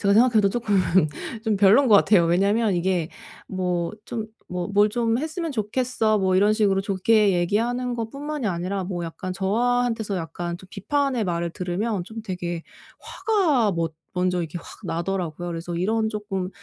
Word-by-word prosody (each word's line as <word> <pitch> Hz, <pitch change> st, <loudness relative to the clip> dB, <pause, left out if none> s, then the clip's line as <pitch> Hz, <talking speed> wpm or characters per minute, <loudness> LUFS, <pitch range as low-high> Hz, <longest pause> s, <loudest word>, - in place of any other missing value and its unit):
제가 200 Hz, -1 st, +3 dB
생각해도 220 Hz, -3 st, +5 dB
쪼끔 210 Hz, -1 st, 0 dB, 0.7 s
좀 220 Hz, -2 st, +1 dB
별론인 205 Hz, +8 st, +5 dB
것 215 Hz, -, +7 dB
같아요. 200 Hz, -3 st, +5 dB
왜냐면 200 Hz, +5 st, +2 dB
이게 175 Hz, -2 st, 0 dB, 0.4 s
뭐 180 Hz, -2 st, -2 dB
좀 220 Hz, -2 st, -4 dB, 0.2 s
뭐 180 Hz, -1 st, -3 dB
"뭘 205 Hz, +1 st, +4 dB
좀 230 Hz, +1 st, 0 dB
했으면 320 Hz, +2 st, -3 dB
좋겠어." 220 Hz, -2 st, 0 dB
뭐 185 Hz, -1 st, +2 dB
이런 205 Hz, +3 st, +4 dB
식으로 205 Hz, -3 st, +2 dB
좋게 200 Hz, +1 st, +3 dB
얘기하는 235 Hz, +8 st, 0 dB
것뿐만이 275 Hz, +4 st, -4 dB
아니라 185 Hz, +1 st, -2 dB
뭐 175 Hz, -2 st, -4 dB
약간 185 Hz, +3 st, -5 dB
저한테서 225 Hz, +2 st, 0 dB
약간 170 Hz, +1 st, -4 dB
좀 190 Hz, -, -15 dB
비판의 270 Hz, +2 st, 0 dB
말을 170 Hz, -1 st, -1 dB
들으면 185 Hz, +3 st, -2 dB
좀 220 Hz, +3 st, -8 dB
되게 175 Hz, -4 st, -4 dB, 0.4 s
화가 310 Hz, -, +1 dB
머 165 Hz, -1 st, -1 dB, 0.2 s
먼저 180 Hz, 0 st, 0 dB
이렇게 170 Hz, 0 st, -4 dB
확 -, -, -12 dB
나더라고요. 175 Hz, -1 st, -3 dB
그래서 170 Hz, 0 st, -5 dB
이런 220 Hz, +5 st, 0 dB
조금 205 Hz, -4 st, -3 dB
200 Hz, 335 characters per minute, -24 LUFS, 180-225 Hz, 0.7 s, 것